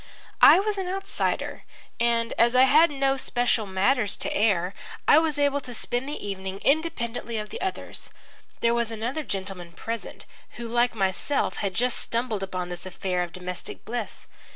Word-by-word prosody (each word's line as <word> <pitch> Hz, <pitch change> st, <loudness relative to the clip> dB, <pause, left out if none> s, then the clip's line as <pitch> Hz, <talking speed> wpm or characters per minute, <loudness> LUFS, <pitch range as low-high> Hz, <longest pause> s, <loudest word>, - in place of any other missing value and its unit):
I -, -, +9 dB
was 410 Hz, 0 st, -1 dB
an 375 Hz, -, -2 dB
outsider, 390 Hz, +1 st, -2 dB, 0.4 s
and, 235 Hz, 0 st, +2 dB
as 235 Hz, +1 st, +4 dB
I 255 Hz, -, +8 dB
had 305 Hz, +5 st, +6 dB
no 275 Hz, -1 st, +1 dB
special 245 Hz, -4 st, +1 dB
matters 200 Hz, +3 st, +2 dB
to -, -, -3 dB
air, 195 Hz, -4 st, +2 dB, 0.3 s
I 300 Hz, -, +8 dB
was 315 Hz, -2 st, 0 dB
able 285 Hz, 0 st, +2 dB
to 245 Hz, -2 st, -9 dB
spend 245 Hz, +4 st, -2 dB
the 295 Hz, -8 st, -5 dB
evening 190 Hz, -1 st, -4 dB
independently 245 Hz, -7 st, 0 dB
of 210 Hz, 0 st, -4 dB
the -, -, -6 dB
others. 380 Hz, 0 st, -4 dB, 0.5 s
There 235 Hz, 0 st, +3 dB
was 235 Hz, -1 st, 0 dB
another 230 Hz, +7 st, -3 dB
gentleman 190 Hz, -, -5 dB
present 230 Hz, +6 st, -6 dB, 0.3 s
who 235 Hz, -1 st, -5 dB
like 240 Hz, +1 st, +2 dB
myself 195 Hz, +8 st, 0 dB
had 195 Hz, -2 st, -2 dB
just 245 Hz, +3 st, +1 dB
stumbled 230 Hz, -3 st, -1 dB
upon 185 Hz, -2 st, -3 dB
this 175 Hz, +1 st, -6 dB
affair 185 Hz, 0 st, -2 dB
of 175 Hz, -1 st, -3 dB
domestic 180 Hz, +1 st, -6 dB
bliss. 235 Hz, -1 st, -5 dB
235 Hz, 170 wpm, -26 LUFS, 195-270 Hz, 0.5 s, I